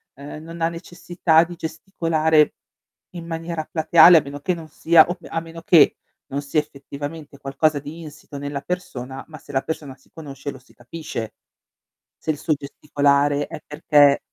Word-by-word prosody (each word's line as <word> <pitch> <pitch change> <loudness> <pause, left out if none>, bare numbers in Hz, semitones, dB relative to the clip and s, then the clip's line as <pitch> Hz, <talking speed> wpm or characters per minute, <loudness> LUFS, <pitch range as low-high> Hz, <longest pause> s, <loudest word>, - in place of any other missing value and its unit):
ehm, 145 +3 -9
non 165 +1 -9
ha 165 - +2
necessità 170 -1 +1
di 175 +1 -8
gesticolare 160 -2 +1 0.6
in 170 -1 -7
maniera 165 -1 -5
plateale 165 +1 +7
a - - +5
meno 140 +1 -8
che 180 - 0
non 165 -2 -8
sia, 160 +1 +5
op 175 0 -4
a 165 - -2
meno 165 0 -10
che 165 -5 +5 0.3
non 140 +1 -3
sia 145 +2 +1
effettivamente 145 +1 -8
qualcosa 145 +2 0
di 150 +4 -9
insito 150 -2 -10
nella 145 0 -4
persona, 135 -7 -5
ma 155 -1 -11
se 145 - -13
la 135 -1 +1
persona 150 -4 -5
si 130 - -29
conosce 140 -3 -7
lo 130 - -12
si 130 - -24
capisce 120 -3 -7 0.9
se 160 - -3
il 150 - -8
suo 155 0 0
gesticolare 145 0 0
è - - -8
perché 145 -2 +4
155 Hz, 170 wpm, -22 LUFS, 140-165 Hz, 0.9 s, plateale